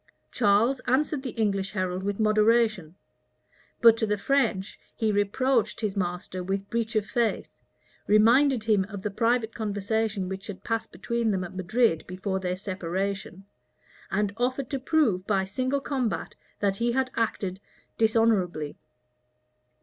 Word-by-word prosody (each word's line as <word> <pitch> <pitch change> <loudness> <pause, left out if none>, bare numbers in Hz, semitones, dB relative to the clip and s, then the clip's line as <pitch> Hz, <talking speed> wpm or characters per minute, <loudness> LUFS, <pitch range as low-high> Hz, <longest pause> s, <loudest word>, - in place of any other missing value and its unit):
Charles 225 +4 +3
answered 280 +2 +1
the 265 - -4
English 200 -3 0
herald 185 -2 -2
with 200 +1 -3
moderation; 215 -5 +2 0.9
but 230 -1 +8
to 220 - 0
the 210 0 0
French 215 -5 0 0.2
he 220 -2 +1
reproached 220 +5 +1
his 210 -2 -1
master 180 0 -3
with 195 +2 -3
breach 230 -1 -1
of 215 -2 +2
faith, 230 +1 -1 0.6
reminded 235 +4 +5
him 215 -3 +3
of 200 -2 -8
the 210 - -2
private 230 +1 +1
conversation 210 -1 -1
which 190 +1 -6
had 195 -2 -8
passed 225 -1 -2
between 235 -1 -1
them 190 -3 0
at 175 - -7
Madrid 190 -1 +1
before 190 +1 -3
their 180 -1 -2
separation, 190 0 -4 0.6
and 205 0 0
offered 255 +2 -1
to 275 - -1
prove 250 - +1
by 195 -3 +2
single 255 +8 -1
combat 265 -5 -2 0.3
that 200 -1 +1
he 235 +2 0
had 260 0 0
acted 195 -4 -1 0.4
dishonorably. 215 -9 +1
210 Hz, 140 wpm, -27 LUFS, 190-235 Hz, 0.9 s, but